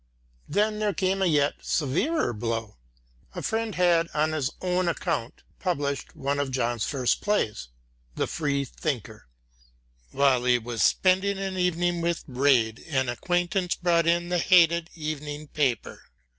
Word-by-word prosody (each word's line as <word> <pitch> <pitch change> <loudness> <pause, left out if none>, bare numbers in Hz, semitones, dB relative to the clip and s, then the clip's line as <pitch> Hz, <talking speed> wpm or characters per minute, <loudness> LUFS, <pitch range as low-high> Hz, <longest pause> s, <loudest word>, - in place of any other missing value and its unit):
Then 210 +5 +1
there 210 -2 0
came 190 +1 0
a 190 - +3
yet 145 -3 +2
severer 165 - 0
blow. 115 - -4 0.6
A - - -5
friend 225 -1 -2
had, 175 -2 +3
on 155 +1 +2
his 150 -4 -1
own 180 0 0
account, 160 -7 -2 0.2
published 145 -6 -2
one 140 +1 -2
of 145 -1 -1
John's 120 -3 -1
first 130 -4 0
plays, 110 - -1 0.5
the - - 0
Free 140 -3 -1
thinker. 115 - -5 0.8
While 130 - +2
he 125 -1 +4
was 120 -1 -4
spending 190 +2 +3
an 195 -1 -3
evening 175 -1 0
with 170 0 -1
Rejd 125 -4 +2
an 130 -3 +1
acquaintance 175 +7 0
brought 170 -1 +2
in 170 +1 +2
the 180 0 +1
hated 170 -1 +4
evening 150 -1 -5
paper. 130 -7 -1
155 Hz, 145 wpm, -26 LUFS, 130-180 Hz, 0.8 s, he